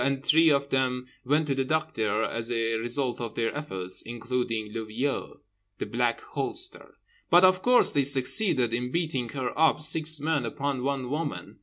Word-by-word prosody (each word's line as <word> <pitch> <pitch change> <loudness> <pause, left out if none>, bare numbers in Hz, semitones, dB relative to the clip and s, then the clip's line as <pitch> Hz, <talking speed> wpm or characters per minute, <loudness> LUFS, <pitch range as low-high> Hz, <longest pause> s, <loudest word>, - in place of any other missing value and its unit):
And 140 0 -1
three 160 +1 +5
of 140 -1 +1
them 130 -1 0 0.2
went 145 +4 +1
to 140 - -1
the 135 0 -1
doctor 130 -8 -1
as 115 +1 -3
a 115 -1 0
result 120 +2 -2
of 115 -2 -6
their 115 +2 -1
efforts, 95 -11 -1
including 115 -2 -3
le 115 -1 -4
vieux 125 +6 -4 0.4
(The - - -4
Black 120 0 -1
Holster). 335 - -5 0.3
But 175 +2 +6
of 185 0 +5
course 250 +3 +4
they 140 - +2
succeeded 135 - +3
in 125 +1 -2
beating 135 -6 -2
her 130 0 -4
up, 160 -1 +3
six 155 +1 +2
men 150 -2 0
upon 135 +3 -3
one 135 -2 -2
woman. 145 -9 -5
135 Hz, 175 wpm, -27 LUFS, 120-150 Hz, 0.4 s, But